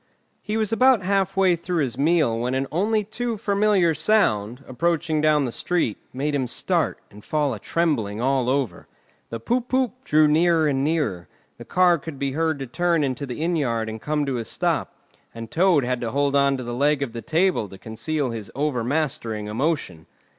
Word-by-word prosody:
He 215 +1 -3
was 220 0 -1
about 250 -3 +4
half 195 0 0
way 190 -2 +4
through 170 -1 -1
his 125 -4 -3
meal 145 -5 +2
when 125 +2 -1
an 135 +1 0
only 210 +6 +1
too 225 +2 -3
familiar 200 -4 +2
sound, 125 - +1
approaching 160 +3 0
down 150 -2 +3
the 120 - -3
street, 170 -6 -1
made 145 +3 -2
him 135 -3 0
start - - -1
and 105 +1 -14
fall 150 -3 0
a 110 - -6
trembling 120 -12 -1
all 130 0 +1
over. 135 -3 -2 0.4
The 115 - -5
poop 240 - -1
poop! 255 0 -1
drew 155 - +4
nearer 160 +1 +3
and 135 -2 0
nearer, 140 - -1 0.3
the - - -9
car 180 -2 +3
could 145 0 -8
be 140 0 -2
heard 160 +2 0
to 135 - -5
turn 170 +4 +1
into 135 +1 -2
the 125 +5 -4
inn 175 +1 +1
yard 115 -7 -1
and 110 0 -6
come 150 -1 -1
to 130 -3 -2
a 115 - -5
stop, - - -1 0.4
and 115 -1 -8
Toad 170 -6 +3
had 125 0 -2
to 120 - -2
hold 140 +2 0
on 140 -1 +3
to 130 - -5
the 120 0 -5
leg 140 +3 +1
of 120 -5 -5
the 115 - -5
table 165 - +1
to 95 - -11
conceal 115 +7 -3
his 110 -3 -6
over 140 -4 -1
mastering 120 -6 -2
emotion. 110 - -2
145 Hz, 200 wpm, -23 LUFS, 120-170 Hz, 0.4 s, about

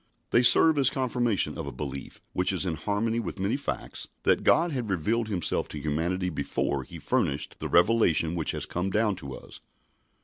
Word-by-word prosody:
They 120 - +5
serve 150 +5 +7
as 135 -2 +5
confirmation 120 -5 0
of - - -5
a - - -4
belief, 70 -2 -7
which 90 +1 +1
is 95 0 -1
in 90 - -1
harmony 105 +7 -1
with 100 -6 -5
many 100 +5 0
facts, 140 - -5 0.2
that - - +2
God 170 +2 +3
had 125 -6 -3
revealed 105 +6 0
Himself 95 -6 -1
to 75 - -7
humanity 85 +5 -1
before 70 -1 -2
He 65 - -10
furnished - - -1
the - - -4
revelation 85 -4 +3
which 85 -3 -2
has - - -2
come 90 +2 -2
down 105 0 +1
to 70 -6 -7
us. - - -12
95 Hz, 190 wpm, -27 LUFS, 80-115 Hz, 0.2 s, serve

